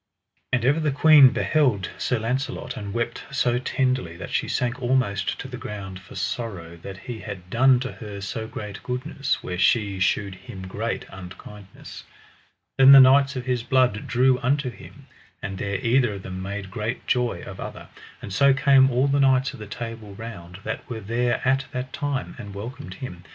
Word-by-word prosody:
And 125 -2 +1
ever 145 +5 +3
the 155 -1 +1
queen 145 -1 +7
beheld 125 -11 +1
Sir 125 - 0
Launcelot, 125 +2 -3
and 100 -1 -6
wept 115 +2 -2
so 125 -3 +1
tenderly 130 - -1
that - - -8
she - - 0
sank 125 +2 -1
almost 120 -6 0
to - - -6
the - - -8
ground 95 -3 -6
for 95 - -14
sorrow 95 -4 -4
that 95 +3 -9
he 120 +1 -7
had 95 -5 -8
done 130 +1 +5
to 130 - -3
her 105 -3 -8
so 110 +3 -4
great 105 -3 -7
goodness 135 +2 -2
where 90 0 -4
she 100 -1 +2
shewed 100 +1 +1
him 95 0 -10
great 110 +5 -3
unkindness. 95 +2 -11 0.8
Then 135 +1 +10
the 135 - +11
knights 135 +2 +6
of 125 -1 -4
his 125 -2 0
blood 125 -3 +1
drew 125 +1 +3
unto 135 0 0
him, 135 +3 -14 0.3
and 95 -2 -5
there 100 -1 -1
either 120 -2 +3
of 95 - -8
them 95 0 -6
made 100 0 -5
great 115 +1 -4
joy 125 -1 0
of - - -9
other. - - -8 0.3
And 100 - -6
so 140 +5 +5
came 135 -1 +5
all 125 +1 +2
the 140 +1 +2
knights 135 -1 +3
of 135 - -11
the 105 - -8
Table 110 -2 -7
Round 95 -4 -9
that 110 - -5
were 115 -2 -4
there 120 +4 0
at 135 +1 +2
that 130 0 -4
time, 140 -2 -3
and 100 -3 -8
welcomed 115 -1 -7
him. 90 -7 -8
120 Hz, 190 wpm, -24 LUFS, 100-130 Hz, 0.8 s, the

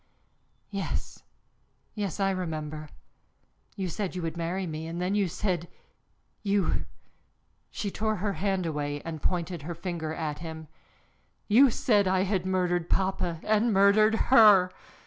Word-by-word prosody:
"Yes, 200 -1 -4 0.7
yes, 205 -4 -3
I 195 0 +2
remember. 155 -4 -4 0.9
You 190 -2 -3
said 185 +2 -4
you 180 - -3
would 165 0 -3
marry 175 +3 -2
me, 160 -1 -5
and 165 +1 -5
then 180 +2 -1
you 205 -2 +2
said, 175 -1 -2 0.7
you," 200 -2 0 0.8
she 205 -3 -4
tore 215 +2 -1
her 200 +1 -2
hand 190 -2 -1
away 145 -2 -3
and 160 -2 -5
pointed 175 -2 -2
her 170 +4 -6
finger 170 -2 -4
at 155 -2 -4
him, 160 -1 -7 0.8
"you 255 +6 +6
said 210 -4 +2
I 185 0 +2
had 190 -2 -1
murdered 175 -2 0
papa 185 -3 0
and 215 +2 +2
murdered 205 +2 +5 0.2
her! 200 -6 +7
185 Hz, 140 wpm, -28 LUFS, 165-200 Hz, 0.9 s, her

